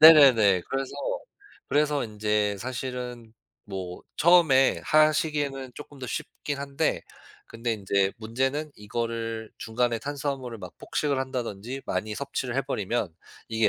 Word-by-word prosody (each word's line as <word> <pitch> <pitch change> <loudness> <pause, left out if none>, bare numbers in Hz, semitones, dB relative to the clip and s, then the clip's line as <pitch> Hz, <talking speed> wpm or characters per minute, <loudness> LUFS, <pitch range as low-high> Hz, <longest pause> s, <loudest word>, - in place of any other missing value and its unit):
네네네. 130 - +9
그래서, 135 0 -2 0.8
그래서 145 -1 +2
인제 105 -1 0
사실은 125 -1 -5 0.3
뭐 95 -3 -6
처음에 155 -6 +6
하시기에는 150 -3 +2
쪼끔 145 0 -10
더 130 - -5
쉽긴 140 +3 -4
한데 140 +3 0 0.5
근데 115 +1 -2
인제 100 -2 +1
문제는 130 +7 -1
이거를 115 +1 -3
중간에 115 +1 0
탄수화물을 135 -3 -3
막 90 -3 -9
폭식을 145 -3 -1
한다든지 125 -2 -3
많이 110 0 -2
섭취를 135 -1 -3
해 135 - +2
버리면 105 - -1 0.3
이게 110 -1 +3
125 Hz, 295 characters per minute, -27 LUFS, 110-140 Hz, 0.8 s, 네네네